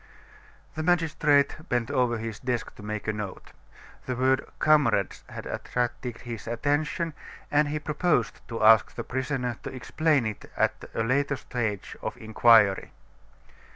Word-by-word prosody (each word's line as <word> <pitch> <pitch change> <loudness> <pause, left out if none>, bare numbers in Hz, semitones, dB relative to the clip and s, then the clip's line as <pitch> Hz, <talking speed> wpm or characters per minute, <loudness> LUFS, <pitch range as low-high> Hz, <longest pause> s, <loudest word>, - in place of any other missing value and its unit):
The 155 - -4
magistrate 155 -4 +2
bent 120 -2 0
over 125 -2 +2
his 110 -1 -5
desk 125 -2 -2
to - - -13
make 105 +1 -5
a 110 - +1
note. 105 -3 -6 0.6
The 130 - -1
word 130 +1 +2
"comrades" 135 -11 +2
had - - -8
attracted 120 -1 -3
his 115 -3 -7
attention, 145 +7 -1 0.4
and 150 +1 +3
he 150 +1 -2
proposed 150 -5 0
to 115 -1 -3
ask 110 0 +6
the 120 - -4
prisoner 130 -1 -2
to - - -6
explain 145 +1 +1
it 110 -2 -5
at - - 0
a 115 - +1
later 140 +4 +1
stage 115 -6 -3
of - - -4
the - - -14
inquiry. 110 -2 +4
125 Hz, 150 wpm, -27 LUFS, 115-145 Hz, 0.6 s, ask